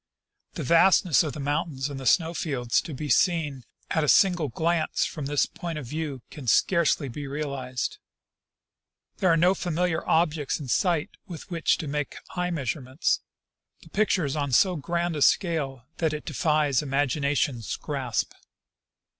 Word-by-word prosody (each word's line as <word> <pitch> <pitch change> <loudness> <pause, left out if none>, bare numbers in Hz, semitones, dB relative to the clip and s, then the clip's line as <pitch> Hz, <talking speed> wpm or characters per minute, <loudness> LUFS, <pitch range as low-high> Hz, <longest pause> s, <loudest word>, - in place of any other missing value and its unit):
The - - -4
vastness 170 +2 +5
of 155 -4 -2
the 150 - -7
mountains 145 -1 -1
and 140 -2 -6
the 130 - -4
snow 165 +2 +3
fields 130 -8 0
to 160 - -8
be 150 +3 -5
seen 150 -6 +1 0.3
at 160 - +1
a - - 0
single 180 -5 +4
glance 160 +5 0
from 145 -3 -5
this 145 0 +2
point 170 -2 -6
of 150 - -6
view 145 -1 -4
can 145 -5 -9
scarcely 165 +1 +3
be 140 +3 -6
realized. 135 -3 -4 1.2
There 185 - +3
are 165 - +4
no 180 +3 +4
familiar 175 -2 -1
objects 155 -3 +1
in 140 -4 -7
sight 170 +1 +1 0.2
with 175 0 -9
which 165 -1 +1
to 155 - -5
make 145 0 -3 0.2
eye 180 0 -1
measurements; 135 - -1 0.6
the - - -16
pic 215 0 +1
ture 180 -5 +2
is 140 - -2
on 140 -3 -2
so 185 - +4
grand 170 +2 -2
a 150 - -3
scale 140 - +1
that 160 -2 0
it 150 - -5
defies 150 -3 +1
imagination's 140 -3 0
grasp." 130 -7 -3
150 Hz, 165 wpm, -26 LUFS, 135-170 Hz, 1.2 s, vastness